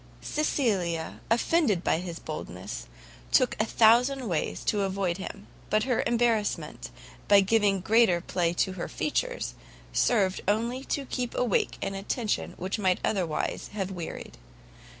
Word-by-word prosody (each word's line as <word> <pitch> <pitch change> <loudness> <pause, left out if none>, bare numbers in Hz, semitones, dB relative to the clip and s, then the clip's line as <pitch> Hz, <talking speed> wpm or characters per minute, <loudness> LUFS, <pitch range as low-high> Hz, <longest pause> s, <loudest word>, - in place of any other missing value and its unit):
Cecilia, 195 - -1
offended 230 - +2
by - - +2
his 175 -2 -6
boldness, - - -6 0.5
looked - - 0
a - - +2
thousand 245 +4 +4
ways 170 -5 -2
to 210 - +1
avoid 195 -2 -1
him; 200 +1 -7 0.2
but 215 0 +2
her 250 -2 +1
embarrassment, 230 -3 0 0.4
by 200 -1 +7
giving 200 -1 +2
greater 220 -3 +4
play 170 -1 0
to 190 +2 +1
her 185 -2 -5
features, - - -2 0.4
served 195 -6 +2
only 235 +5 0
to 280 - -2
keep 250 -1 -3
awake 240 -6 +1
an 195 - -2
attention 210 +3 -2
which 190 +4 -3
might 185 -3 +2
otherwise 180 -7 -1
have 195 -2 -3
wearied. 170 - -7
205 Hz, 135 wpm, -28 LUFS, 185-235 Hz, 0.5 s, by